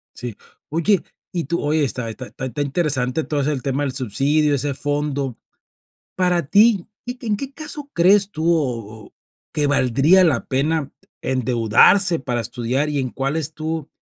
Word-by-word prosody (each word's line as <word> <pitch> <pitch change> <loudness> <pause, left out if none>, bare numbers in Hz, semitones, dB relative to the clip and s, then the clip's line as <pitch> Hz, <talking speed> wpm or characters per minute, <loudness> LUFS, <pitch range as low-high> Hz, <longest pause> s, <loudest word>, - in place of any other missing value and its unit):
Sí, 120 -3 -6 0.3
oye, 170 +6 +2 0.3
y 170 -4 -2
tú 170 +5 -2
oye, 150 +1 +1
está 125 -3 -2
está 125 +3 -8
está 135 +2 -3
interesante 140 -1 0
todo 145 -2 -1
ese 150 - 0
el 130 - -4
tema 135 +1 -1
del 135 -3 -2
subsidio, 145 +5 +1
ese 140 +1 -1
fondo. 145 -2 -2 0.8
Para 180 -3 +1
ti, 205 +2 +4 0.2
¿y 245 - -3
que 245 - -10
en 210 - +1
qué 275 +4 -6
caso 295 -1 -8
crees 195 +3 +4
tú, 165 0 +1
o 115 -9 -2
o - - -21 0.4
que 150 -2 +1
valdría 140 +7 +4
la 140 -8 +1
pena 145 +2 0 0.3
endeudarse 130 - +4
para 125 -2 -2
estudiar 125 +5 -1
y 150 -1 -1
en 130 -2 -2
cuáles, 150 +3 -2
tú 160 -1 -4
145 Hz, 165 wpm, -21 LUFS, 130-170 Hz, 0.8 s, ti